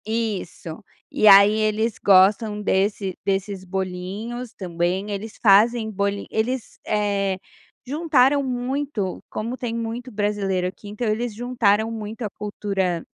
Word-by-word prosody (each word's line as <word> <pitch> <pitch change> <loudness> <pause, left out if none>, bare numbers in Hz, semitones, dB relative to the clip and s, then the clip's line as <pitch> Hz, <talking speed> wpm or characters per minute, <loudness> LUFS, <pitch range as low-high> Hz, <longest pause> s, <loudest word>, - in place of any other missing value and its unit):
Isso. 215 -5 -4 0.3
E 215 - +3
aí, 200 +1 +9
eles 215 +1 0
gostam 205 +2 +4
desse 195 -1 0
desses 195 0 -1
bolinhos 190 +6 -5
também. 180 +2 -2
Eles 205 +2 -6
fazem 220 +2 +4
boli 200 0 -2
eles, 235 +3 -2
eh, 200 -2 0 0.5
juntaram 285 -1 +3
muito. 255 -5 -3
Como 235 +4 -4
tem 235 -2 -4
muito 230 +2 -4
brasileiro 205 -3 -1
aqui, 195 +3 -9
então 215 +3 -3
eles 220 +2 -1
juntaram 225 -2 +1
muito 220 +1 -6
a 215 - -2
cultura, 195 -4 -3
210 Hz, 125 wpm, -23 LUFS, 195-230 Hz, 0.5 s, aí